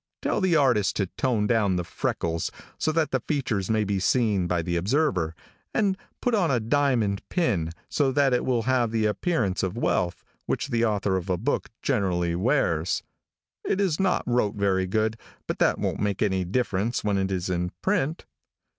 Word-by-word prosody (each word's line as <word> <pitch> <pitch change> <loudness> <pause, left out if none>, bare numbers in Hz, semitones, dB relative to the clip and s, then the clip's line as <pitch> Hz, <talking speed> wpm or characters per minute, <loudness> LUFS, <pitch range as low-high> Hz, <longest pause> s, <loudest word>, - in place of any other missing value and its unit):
Tell - - 0
the 185 -3 +3
artist 125 -9 +3
to 100 - +1
tone 115 +2 0
down 105 -4 +2
the 90 - -1
freckles 85 -1 -2 0.3
so 155 - +1
that 155 -1 +1
the 130 - +1
features 120 - -2
may 110 -1 +2
be 100 -1 -1
seen 100 -2 +2
by 85 -1 0
the 85 +1 -2
observer, 95 - +1 0.4
and 200 -3 +2 0.3
put 245 - +1
on 195 -6 +3
a 125 -3 +2
diamond 115 -4 +1
pin, 105 - 0 0.2
so 140 -3 +1
that 135 -1 +3
it 125 - +2
will 120 -3 +1
have 125 -1 +2
the 110 -1 0
appearance 105 - 0
of 95 +3 -2
wealth, 90 -6 0 0.2
which - - -1
the 115 -3 +1
author 105 -3 +1
of 95 +1 -5
a 90 - +1
book 120 +11 -1
generally 90 -9 +1
wears. 90 - +1 0.6
It 195 - 0
is 185 -6 +1
not 190 -2 +2
wrote 120 -4 +1
very 95 -2 +1
good, 110 +3 0 0.3
but - - -4
that - - +3
won't - - -2
make 100 -2 0
any 95 -3 0
difference 110 +2 -1
when 100 -2 +1
it 95 0 -1
is 90 -2 -1
in 90 0 -1
print. 175 -5 0
110 Hz, 185 wpm, -26 LUFS, 95-135 Hz, 0.6 s, the